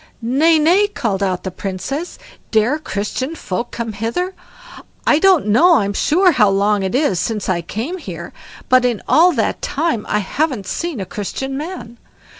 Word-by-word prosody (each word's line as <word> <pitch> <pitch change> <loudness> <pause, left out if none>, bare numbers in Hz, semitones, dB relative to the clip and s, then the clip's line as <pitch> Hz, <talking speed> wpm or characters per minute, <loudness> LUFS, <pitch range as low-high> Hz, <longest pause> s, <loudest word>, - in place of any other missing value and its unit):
"Nay, 300 +8 +3
nay", 350 +7 +4
called 220 - -2
out 185 -2 -1
the 190 - -4
Princess, 195 - -5 0.3
"dare 230 +7 +2
Christian 260 +4 -3
folk 230 - -4
come 230 -2 -5
hither? 235 - -2 0.7
I 300 - +4
don't 375 -3 +4
know 320 - +5
I'm 200 -6 +1
sure 360 - +3
how 225 -9 +4
long 200 +1 +2
it 190 +4 -2
is 260 - +1
since 220 -4 -2
I 175 -2 0
came 235 - -5
here, 170 - -8 0.3
but 255 0 +4
in 240 -4 0
all 345 +3 +5
that - - -1
time 295 -7 -1
I - - +1
haven't 240 +2 -1
seen 335 - -3
a 190 - -3
Christian 240 +8 -5
man. 270 -7 -7
240 Hz, 170 wpm, -18 LUFS, 200-315 Hz, 0.7 s, know